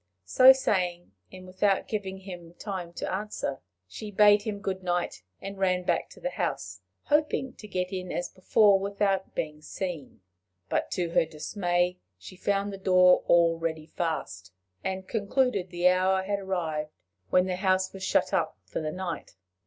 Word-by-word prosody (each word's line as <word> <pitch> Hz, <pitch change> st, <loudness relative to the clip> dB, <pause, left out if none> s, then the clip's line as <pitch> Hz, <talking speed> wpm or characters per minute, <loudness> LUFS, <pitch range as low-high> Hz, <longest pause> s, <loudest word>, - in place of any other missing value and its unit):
So 255 Hz, -, +8 dB
saying, 180 Hz, -, 0 dB, 0.2 s
and 185 Hz, 0 st, -11 dB
without 190 Hz, +1 st, +1 dB
giving 190 Hz, -3 st, -4 dB
him 175 Hz, -3 st, -10 dB
time 185 Hz, -4 st, -5 dB
to -, -, -4 dB
answer, 195 Hz, -8 st, -3 dB, 0.3 s
she 210 Hz, -, -8 dB
bade 205 Hz, 0 st, +6 dB
him 210 Hz, -1 st, -4 dB
good 190 Hz, -2 st, -3 dB
night, 175 Hz, -1 st, -2 dB, 0.2 s
and 195 Hz, 0 st, -7 dB
ran 185 Hz, -1 st, +1 dB
back -, -, 0 dB
to -, -, -15 dB
the -, -, -3 dB
house, -, -, -3 dB, 0.2 s
hoping 295 Hz, -3 st, +1 dB
to 210 Hz, -, -10 dB
get 185 Hz, -1 st, -3 dB
in 185 Hz, -1 st, -4 dB
as 175 Hz, -, -2 dB
before 200 Hz, +1 st, +4 dB
without 195 Hz, -1 st, -1 dB
being 150 Hz, -1 st, -3 dB
seen. 165 Hz, -, -6 dB, 0.5 s
But -, -, 0 dB
to 175 Hz, -3 st, -1 dB
her 165 Hz, -, +3 dB
dismay 175 Hz, +3 st, -1 dB, 0.2 s
she 185 Hz, -, -12 dB
found 200 Hz, +2 st, -1 dB
the 195 Hz, -, -7 dB
door 185 Hz, -1 st, +5 dB
already 165 Hz, -2 st, +2 dB
fast, 155 Hz, -, -4 dB, 0.3 s
and 190 Hz, 0 st, -3 dB
concluded 220 Hz, -2 st, 0 dB
the 175 Hz, 0 st, +3 dB
hour 190 Hz, +1 st, +2 dB
had 200 Hz, +1 st, -1 dB
arrived 165 Hz, -6 st, -2 dB, 0.4 s
when 180 Hz, 0 st, +4 dB
the 185 Hz, -1 st, -2 dB
house 185 Hz, -1 st, +1 dB
was 195 Hz, -, -9 dB
shut -, -, +1 dB
up -, -, 0 dB
for -, -, -4 dB
the 155 Hz, -1 st, -2 dB
night. 180 Hz, 0 st, -5 dB
185 Hz, 165 wpm, -28 LUFS, 175-200 Hz, 0.5 s, So